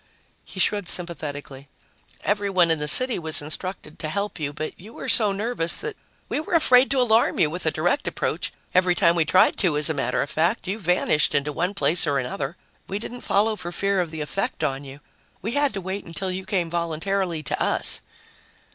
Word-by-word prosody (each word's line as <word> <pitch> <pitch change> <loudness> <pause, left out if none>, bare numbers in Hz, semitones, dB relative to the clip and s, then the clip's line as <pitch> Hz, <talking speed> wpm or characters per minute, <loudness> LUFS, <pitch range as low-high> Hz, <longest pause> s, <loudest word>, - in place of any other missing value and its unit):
He 190 - -9
shrugged 205 0 +1
sympathetically. 145 -5 -5 0.6
"Everyone 195 -4 +2
in 160 - +3
the 150 - -1
city 255 - +6
was 160 -2 -2
instructed 155 +1 -6
to 155 - -3
help 200 +1 -3
you, 145 -2 -2
but 155 +1 -5
you 210 +6 -12
were - - -7
so 215 -3 +4
nervous 195 -4 -1
that 435 0 -5 0.3
we - - -1
were 315 +3 -2
afraid 255 -5 +5
to 275 - +2
alarm 230 -2 +3
you 150 - +3
with 175 0 -3
a - - +3
direct 175 - 0
approach. - - -2 0.2
Every 180 -1 +4
time 170 -3 +4
we 165 -2 +2
tried 185 +4 +4
to, 170 -6 +2
as 150 +2 +1
a - - 0
matter 125 -4 0
of 140 - -7
fact, 175 +7 0
you 200 +4 -2
vanished 180 -5 +2
into 145 +1 +1
one 180 +6 -1
place 175 -3 +1
or 140 -1 +2
another. 135 +1 -3 0.3
We 195 - -3
didn't 240 +3 -7
follow 215 +2 +2
for 175 -4 -6
fear 195 +1 +1
of 175 - -3
the 160 -1 -6
effect 150 +7 -3
on 135 0 -1
you. 140 +1 -11 0.4
We 220 - -2
had 285 +2 +2
to 195 - -3
wait 190 +2 -4
until 185 +3 -4
you 185 +1 -5
came 180 -5 -1
voluntarily 170 0 -1
to 125 - -2
us." - - +1
180 Hz, 210 wpm, -24 LUFS, 155-200 Hz, 0.6 s, city